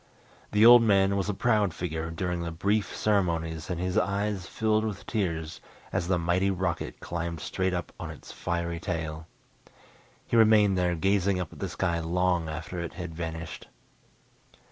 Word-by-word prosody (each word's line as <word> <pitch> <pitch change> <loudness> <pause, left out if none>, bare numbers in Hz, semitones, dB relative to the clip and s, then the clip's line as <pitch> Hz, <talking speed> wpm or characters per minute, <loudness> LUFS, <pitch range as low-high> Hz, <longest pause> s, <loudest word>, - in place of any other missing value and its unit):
The 105 +2 +5
old 120 0 +10
man 100 -3 +3
was 100 0 -1
a - - +1
proud 105 -6 +2
figure 80 -2 -3
during 90 +1 -2
the 85 - -3
brief 100 +6 0
ceremonies 85 -5 0
and 90 -2 -2
his 90 +3 +1
eyes 100 0 -1
filled 110 -1 +1
with 105 -3 -4
tears 85 -7 -2 0.3
as 85 - 0
the 90 -1 +2
mighty 85 +3 +1
rocket 90 -3 -2
climbed 85 -1 -4
straight 95 +5 -1
up 90 - -4
on - - -5
its - - -10
fiery 85 -1 -3
tail. 80 -3 -4 1.0
He - - -2
remained 110 -3 +6
there 90 -1 +1
gazing 95 +2 +1
up 90 -4 -5
at - - -13
the - - -3
sky 85 -1 -1
long 85 0 0
after 85 +3 -5
it 85 -1 -4
had 85 -3 -6
vanished. 80 0 -6
90 Hz, 165 wpm, -28 LUFS, 85-100 Hz, 1.0 s, old